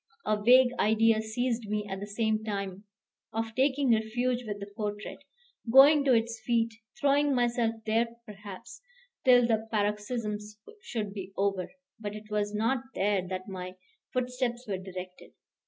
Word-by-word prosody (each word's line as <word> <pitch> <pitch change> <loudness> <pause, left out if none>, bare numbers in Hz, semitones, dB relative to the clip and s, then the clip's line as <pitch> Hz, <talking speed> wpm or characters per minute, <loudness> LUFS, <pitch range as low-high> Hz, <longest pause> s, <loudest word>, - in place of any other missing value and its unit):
A 215 - +2
vague 250 +3 +6
idea 220 +1 +4
seized 230 0 -2
me 210 0 -1
at 190 -1 -4
the 205 - -6
same 220 +1 0
time, 200 -2 -4 0.5
of 225 0 -3
taking 270 +1 +2
refuge 240 +3 0
with 205 -1 -4
the 200 - -5
portrait, 210 -1 -4 0.5
going 280 +3 +8
to 265 - +5
its 230 0 0
feet, 230 -1 +1 0.3
throwing 285 0 +3
myself 240 -2 +1
there, 225 +2 +2 0.2
perhaps, 210 0 -10 0.4
till 245 -2 +7
the 225 -1 0
paroxysm 210 +1 -1 0.4
should 220 - -4
be 195 -1 -7
over. 195 -2 0 0.3
But 210 -1 -5
it 215 0 -11
was 205 -1 0
not 230 +5 0
there 200 -1 +2
that 185 0 -5
my 185 -1 -6 0.4
footsteps 250 -1 -2
were 195 -3 -2
directed. 185 -1 -9
220 Hz, 150 wpm, -29 LUFS, 205-245 Hz, 0.5 s, going